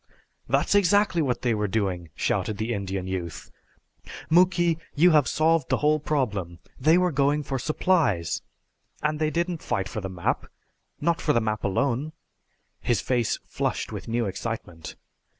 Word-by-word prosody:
"That's - - +2
exactly 200 -2 +3
what 130 -5 -1
they 120 -2 +2
were 105 -1 0
doing!" 95 -5 -2
shouted 105 - -1
the 110 +3 -2
Indian 95 -3 -3
youth. 90 -3 -5 0.8
"Muky, 175 -1 +4 0.2
you 175 +4 +6
have 150 -4 +4
solved 160 -2 +2
the - - +2
whole 150 +1 +2
problem. 105 - -2 0.2
They 155 +6 +5
were 180 -1 +2
going 145 +1 +2
for 135 -1 -3
supplies. 140 - +1 0.6
And 150 0 0
they 155 -1 +1
didn't 170 +1 -2
fight 95 - -1
for 110 - -5
the 95 - -4
map 90 -2 -2 0.5
not 170 -1 +1
for 150 - +2
the 115 - +4
map 110 -1 -2
alone!" 135 +8 0 0.7
His 120 -4 +1
face 120 -4 0
flushed - - -2
with - - -7
new 115 0 0
excitement. 95 -5 -5
130 Hz, 155 wpm, -26 LUFS, 100-155 Hz, 0.8 s, you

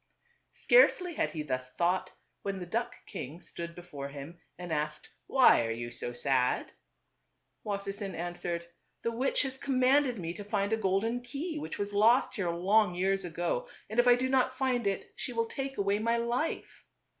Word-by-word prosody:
Scarcely 365 -8 +4
had - - 0
he 155 -2 -4
thus 130 -3 -4
thought, 180 +2 +1 0.3
when 195 -1 -3
the 180 - -5
duck 230 +7 -3
king 165 -5 -7
stood 170 -1 -7
before 160 -6 -7
him 145 +4 -9 0.2
and 175 -2 -5
asked, 150 0 -3 0.2
"Why 260 - +6
are 115 - -2
you 120 +1 -4
so 120 0 -3
sad? 125 +1 +1 0.5
" - - -49
Wassersein 200 -2 -4
answered, 170 0 -3 0.2
" - - -46
The 230 - 0
witch 255 +5 +1
has 265 -1 -4
com 265 -2 0
manded 255 -1 +4
me 170 -2 -4
to 205 - -7
find 205 0 0
a - - +5
golden 220 +4 0
key 295 +6 -4
which - - -5
was 205 0 -3
lost 235 +5 +4
here 190 -6 -1
long 185 +3 +3
years 195 +2 +1
ago, 175 - -2 0.2
and 220 - 0
if 245 - +5
I 245 - +8
do 255 +1 0
not 260 -1 +2
find 250 -5 +1
it, 195 - -3
she 250 - -4
will 230 -1 +1
take 270 +3 -5
away 200 +1 +1
my 230 +2 +1
life." 240 +7 -2
200 Hz, 190 wpm, -30 LUFS, 170-245 Hz, 0.5 s, I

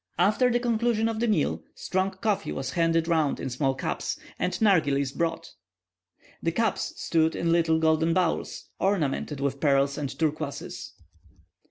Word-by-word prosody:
After 210 +8 +3
the 240 0 +2
conclusion 235 -1 +1
of 225 -1 -2
the 235 - +1
meal, 215 - +1
strong 185 +1 -1
coffee 205 -1 -2
was 135 0 -4
handed 165 -1 +1
round 160 -4 +1
in 130 - -4
small 135 +2 0
cups, 130 - -3 0.2
and 180 - 0
nargillies 145 -10 +3
brought. 165 0 -2 0.9
The 165 - 0
cups 220 +5 -1
stood 160 -1 +1
in 170 - 0
little 165 -1 +3
golden 160 +1 +2
bowls, 175 -1 -1
ornamented 155 -6 0
with 140 0 -1
pearls 140 -1 +2
and 140 -2 -2
turquoises. 155 -2 -3
165 Hz, 150 wpm, -27 LUFS, 145-195 Hz, 0.9 s, After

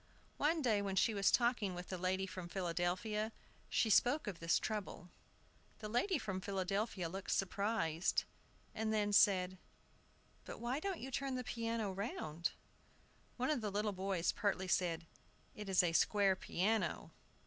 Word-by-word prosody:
One 315 +1 +2
day, 220 -5 +3
when 195 -1 -2
she 220 +4 +3
was 200 -1 +3
talking 235 -6 +2
with 180 0 -7
the 185 - -3
lady 185 +1 0
from 185 -2 -7
Philadelphia, 185 +5 -1 0.4
she 220 - +2
spoke 245 +9 +4
of 195 -5 -5
this 165 0 +3
trouble. 200 -5 -4 0.7
The 215 - -6
lady 275 - +2
from 190 -7 -3
Philadelphia 195 0 -1
looked 190 +3 -6
surprised, 190 -4 +1 0.5
and 220 -1 -1
then 205 -1 +1
said, 185 -2 +4 0.8
"But - - -8
why 240 +4 -1
don't 385 +1 -3
you 265 - -6
turn 270 0 -1
the 255 - -2
piano 230 -3 -2
round?" 175 -5 -3 0.9
One 255 +3 +1
of 285 -6 0
the 215 - -1
little 205 +1 -1
boys 190 -2 0
pertly 190 -2 -1
said, 170 -2 +1 0.5
"It 210 -2 -7
is 185 -1 +5
a 170 -2 +1
square 200 +2 +4
piano." 190 0 -1
200 Hz, 155 wpm, -37 LUFS, 185-225 Hz, 0.9 s, is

